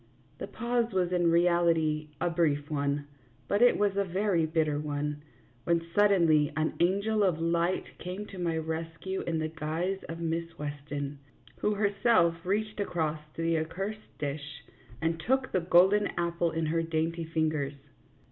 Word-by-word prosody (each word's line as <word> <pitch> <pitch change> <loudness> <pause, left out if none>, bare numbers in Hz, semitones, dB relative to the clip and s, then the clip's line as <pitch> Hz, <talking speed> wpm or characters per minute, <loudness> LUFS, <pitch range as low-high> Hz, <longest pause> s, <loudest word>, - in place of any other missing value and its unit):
The - - -4
pause 240 -1 -1
was 180 -2 +1
in 175 -2 +3
reality 165 -3 +2
a 140 - +1
brief 150 -3 +1
one, 145 0 -1 0.4
but 205 - +1
it 245 - +6
was 205 -1 +1
a 200 - +2
very 185 -3 +1
bitter 155 -2 +1
one, 150 0 -3 0.4
when 170 +1 +1
suddenly 170 -8 +4
an 155 0 +1
angel 200 +5 +2
of 180 -5 +2
light 170 +2 0
came 185 +4 -5
to 195 -3 -10
my 170 -2 0
rescue 165 +4 -4
in 165 -1 -2
the 155 0 -1
guise 165 +4 -2
of 165 - -4
Miss 165 0 -3
Weston, 145 -1 -5 0.4
who 210 - +1
herself 200 -5 +2
reached 215 +3 -1
across 160 -6 -1 0.2
to 165 - -3
the 165 -1 +2
accursed 195 +7 -5
dish 145 0 -5 0.4
and 165 0 0
took 260 +9 0
the 185 - +1
golden 185 +4 +5
apple 170 0 0
in 160 0 -1
her 165 +2 +1
dainty 165 +1 -1
fingers. 155 -3 -1
165 Hz, 155 wpm, -29 LUFS, 155-190 Hz, 0.4 s, it